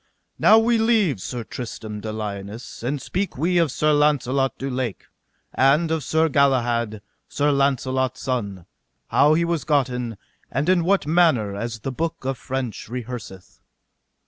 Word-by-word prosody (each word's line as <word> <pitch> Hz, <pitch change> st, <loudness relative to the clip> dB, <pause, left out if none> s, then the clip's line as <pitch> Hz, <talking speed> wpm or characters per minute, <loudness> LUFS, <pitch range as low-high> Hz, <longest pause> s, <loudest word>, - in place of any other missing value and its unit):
Now 220 Hz, -, +7 dB
leave 225 Hz, -, +3 dB
we -, -, -16 dB
Sir 120 Hz, +5 st, -5 dB
Tristram 110 Hz, -2 st, -7 dB
de 110 Hz, -, -4 dB
Liones, 105 Hz, +1 st, -6 dB
and 135 Hz, +5 st, -2 dB
speak 185 Hz, +7 st, -3 dB
we 175 Hz, +5 st, +2 dB
of 165 Hz, -5 st, +2 dB
Sir 150 Hz, +3 st, +2 dB
Launcelot 140 Hz, -3 st, +2 dB
du 135 Hz, -, -4 dB
Lake, 125 Hz, -5 st, -3 dB, 0.5 s
and 150 Hz, +5 st, +3 dB
of 160 Hz, -2 st, -1 dB
Sir 160 Hz, +4 st, +2 dB
Galahad, 120 Hz, -7 st, +1 dB, 0.3 s
Sir 145 Hz, 0 st, +1 dB
Launcelot's 130 Hz, -2 st, 0 dB
son, 100 Hz, -9 st, -3 dB, 0.4 s
how 150 Hz, +2 st, +4 dB
he 170 Hz, +1 st, +2 dB
was 170 Hz, -2 st, -1 dB
gotten, 125 Hz, -6 st, 0 dB, 0.3 s
and 140 Hz, +7 st, -1 dB
in 185 Hz, -2 st, +4 dB
what 195 Hz, -3 st, +2 dB
manner, 150 Hz, -, +3 dB
as 115 Hz, +1 st, -5 dB
the 135 Hz, -, -3 dB
book 160 Hz, 0 st, -4 dB
of 135 Hz, -2 st, -2 dB
French 130 Hz, -6 st, -4 dB
rehearseth. 120 Hz, -6 st, -7 dB
135 Hz, 150 wpm, -23 LUFS, 120-155 Hz, 0.5 s, Now